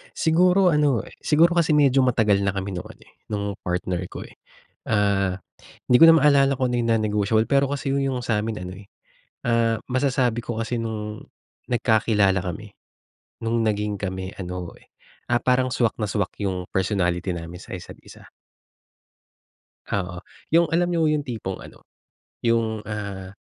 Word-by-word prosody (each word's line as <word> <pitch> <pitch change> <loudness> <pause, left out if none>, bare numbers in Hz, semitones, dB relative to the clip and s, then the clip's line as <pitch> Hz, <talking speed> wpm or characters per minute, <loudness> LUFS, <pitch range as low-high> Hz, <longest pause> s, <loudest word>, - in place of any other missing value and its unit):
Siguro 180 +3 +4
ano, 145 -7 +2
eh, - - -14
siguro 165 +3 +4
kasi 165 -2 +3
medyo 135 -2 +4
matagal 110 -6 +2
na 100 -1 0
kami 95 0 -3
nung 90 - -5
ano, - - -15
eh, - - -24 0.2
nung 105 -2 -2 0.2
partner 90 0 -2
ko, - - -8
eh. - - -16 0.5
Ah, 100 -3 +1 0.5
'di 125 - +5
ko - - +11
na 165 - +8
maalala 140 -3 +4
kung 130 -1 0
ano 120 - 0
yung 115 - -1
non-negotiable, 110 0 +2
pero 140 +4 +2
kasi 140 -1 -2
yung 140 - +1
yung 135 -2 -1
sa'min 110 -1 -1
ano, 90 0 -7
eh, 100 - -15 0.6
ah, 115 -1 +2
masasabi 130 -2 +1
ko 115 -1 -4
kasi 120 +2 -2
nung 110 -1 -5 0.5
nagkakilala 110 -5 +2
kami, 100 +3 -6 0.7
nung 115 +1 0
naging 105 -1 -1
kami 95 -1 -4
ano, 90 -2 -5
eh, - - -25 0.4
ah, 120 - +4
parang 130 0 +2
swak 120 -3 +1
na 105 - 0
swak 100 -2 -1
yung 95 -2 -2
personality 90 -1 0
namin 85 +1 -8
sa - - -8
isa't 90 - -11
isa. - - -15 1.6
Oo, 90 -3 -3 0.3
yung 170 +1 +5
alam 175 +1 +2
niyo 165 -2 +2
yung 150 -1 +1
tipong 110 -8 -5
ano, - - -13 0.7
yung, 115 -2 0
ah, 100 -3 -6
110 Hz, 165 wpm, -23 LUFS, 100-130 Hz, 1.6 s, ko